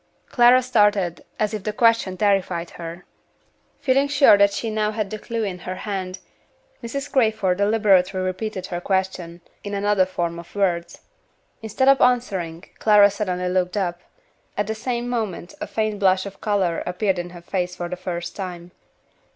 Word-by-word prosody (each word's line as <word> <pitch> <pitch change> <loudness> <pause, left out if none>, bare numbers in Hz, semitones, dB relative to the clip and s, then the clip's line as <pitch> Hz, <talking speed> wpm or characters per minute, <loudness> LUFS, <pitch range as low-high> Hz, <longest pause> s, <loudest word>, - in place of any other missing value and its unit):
Clara 250 +1 +5
started 205 -8 +2
as 215 0 0
if 210 -3 -4
the 215 - -2
question 225 -4 +2
terrified 190 -4 0
her. 170 +1 -8 0.8
Feeling 275 +1 +2
sure 285 -6 +6
that 200 0 +4
she 225 +2 -3
now 215 0 0
had 215 -2 -3
the 215 - -5
clew 230 +1 -3
in 190 -3 -4
her 185 +1 -5
hand, 190 -1 -4 0.6
Mrs. 275 +4 -5
Crayford 215 -8 +2
deliberately 200 -3 +3
repeated 185 +1 -3
her 175 -3 -5
question, 185 -3 -2 0.2
in 205 0 -4
another 200 -2 +2
form 170 -2 -3
of 170 - -13
words. 175 -4 -1 0.6
Instead 225 +4 -1
of 275 0 +6
answering, 190 -9 +1 0.2
Clara 205 -2 +6
suddenly 180 -3 -2
looked 180 +1 0
up. 175 -3 -2 0.6
At 205 - +1
the 220 - -2
same 240 +2 -3
moment 220 -7 -3
a - - -3
faint 215 -2 -2
flush 190 -1 +3
of 200 -1 -10
color 195 -5 0
appeared 185 +1 0
in 175 0 -5
her 175 -1 -11
face 180 0 -2
for 175 -1 -4
the 180 - -4
first 175 -1 -5
time. 180 -3 -7
195 Hz, 165 wpm, -22 LUFS, 180-215 Hz, 0.8 s, sure